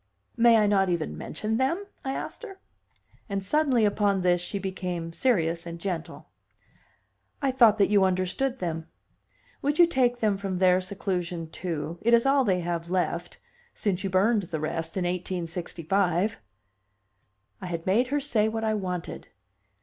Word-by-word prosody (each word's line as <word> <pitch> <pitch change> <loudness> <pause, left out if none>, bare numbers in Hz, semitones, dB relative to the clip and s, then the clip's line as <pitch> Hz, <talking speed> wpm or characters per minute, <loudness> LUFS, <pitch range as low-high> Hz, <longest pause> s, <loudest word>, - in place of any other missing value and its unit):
"May 235 -1 +6
I 215 - +4
not 195 -2 +3
even 170 - -1
mention 215 - -3
them?" 330 +10 0 0.2
I 270 - -2
asked - - -6
her. 405 -5 -9 0.7
And 195 -1 -3
suddenly 270 -3 +2
upon 205 -2 +1
this 180 -1 +2
she 190 +3 -4
became 180 -3 -4
serious 170 -6 +1
and 170 0 -6
gentle. 170 -3 -5 1.1
"I 275 -3 +1
thought 235 -5 +5
that 205 -1 +3
you 200 -2 +5
understood 190 +8 0
them. 165 -5 -4 0.7
Would 290 +2 0
you 345 - +8
take 255 -7 +1
them 215 -4 +1
from 195 -2 -3
their 185 0 +4
seclusion, 180 -3 -3
too? 165 -2 -4
It 235 +1 +5
is 235 - +2
all 275 0 +4
they 185 -6 +1
have 170 0 -3
left 175 -1 -2 0.4
since 190 -3 -1
you 195 - -1
burned 205 +4 +3
the 160 - -3
rest 165 +3 -3
in 185 - 0
1865." 175 +1 -1 1.2
I - - -6
had 170 -2 -4
made 225 +7 +3
her 290 +3 0
say 235 -7 +1
what 220 0 -3
I 220 -1 +1
wanted! 180 -4 -4
190 Hz, 160 wpm, -27 LUFS, 175-225 Hz, 1.2 s, you